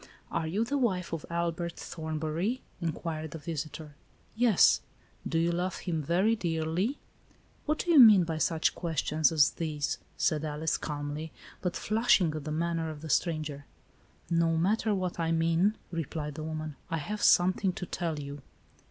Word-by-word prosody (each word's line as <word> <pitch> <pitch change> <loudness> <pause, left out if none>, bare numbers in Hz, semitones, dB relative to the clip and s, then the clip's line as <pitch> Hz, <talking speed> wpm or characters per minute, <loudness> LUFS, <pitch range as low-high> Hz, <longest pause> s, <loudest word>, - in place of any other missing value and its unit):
"Are 160 - -1
you 205 +8 0
the' 280 +4 -1
wife 185 -9 0
of 165 - -4
Albert 170 0 -2
Thornbury," 160 +8 -3 0.2
in 165 -1 0
quired 160 0 -5
the 160 - -7
visitor. 155 -1 -6 0.2
" - - -34
Yes." 215 -7 +5 0.2
" - - -12
Do 165 - 0
you 170 +1 +2
love 180 +2 -1
him 165 -3 -1
very 185 +9 +2
dearly? 170 - -1 0.2
" - - -32
" - - -34
What 305 +1 +1
do 350 - -1
you 315 - +7
mean 215 -7 +9
by 160 -1 -3
such 165 0 +2
questions 160 -1 +1
as 150 -3 +5
these? 155 -3 -2
" - - -35
s£id 155 -1 +1
Alice, 155 +1 -1
calmly, 150 +1 -5 0.3
but 180 -1 -2
flushing 215 -7 +3
at 150 -2 -5
the 155 - -3
manner 165 0 -1
of 150 -2 -8
the 160 - -7
stranger. 150 -2 -1 0.4
" - - -31
No 165 -1 +2
matter 210 +5 +2
what 185 -2 -3
I 165 0 0
mean," 165 +6 +2
replied 155 -2 -4
the 155 - -7
woman, 155 -2 -5
"I 165 - -1
have 210 +8 -4
something 185 +2 +4
to 180 - -5
tell 170 -3 -3
you." 140 0 -7
165 Hz, 185 wpm, -29 LUFS, 155-180 Hz, 0.4 s, mean